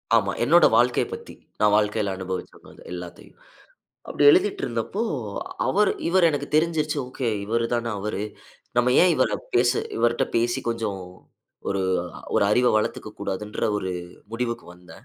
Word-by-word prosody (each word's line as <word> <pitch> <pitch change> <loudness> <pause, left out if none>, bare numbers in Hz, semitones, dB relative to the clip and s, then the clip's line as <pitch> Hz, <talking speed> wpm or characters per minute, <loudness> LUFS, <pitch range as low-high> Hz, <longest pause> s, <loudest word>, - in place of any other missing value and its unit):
ஆமா, - - +2
என்னோட - - +6
வாழ்க்கைய - - +3
பத்தி. 465 0 -8 0.3
நான் 105 -1 +4
வாழ்க்கையில 105 -1 0
அனுபவிச்ச 95 0 -7 0.2
எல்லாத்தையும். 90 -1 -10 0.7
அப்படி - - 0
எழுதிட்டு 205 +7 +2
இருந்தப்போ 120 - -3 0.7
அவரு 205 +2 +3 0.2
இவரு 175 -1 +5
எனக்கு 145 -1 -3
தெரிஞ்சிருச்சு 155 -2 +1
ஓகே, 125 -1 -3 0.2
இவரு 115 +3 0
தான 120 -1 -1
அவரு. 105 0 -3 0.6
நம்ம 125 +1 +3
ஏன் 180 -1 +5
இவர 130 -6 +2 0.7
இவர்ட 120 +1 +2
பேசி 120 +1 +1
கொஞ்சம் 110 -4 -2 0.7
ஒரு 100 -1 0 0.5
ஒரு - - +4
அறிவ 125 +4 +3
வளர்த்துக்க 110 0 -2
கூடாதுன்ற 100 +1 -4 0.2
ஒரு 95 -2 -3 0.4
முடிவுக்கு 115 0 -3
வந்தேன். 90 0 -16
115 Hz, 130 wpm, -24 LUFS, 105-145 Hz, 0.7 s, என்னோட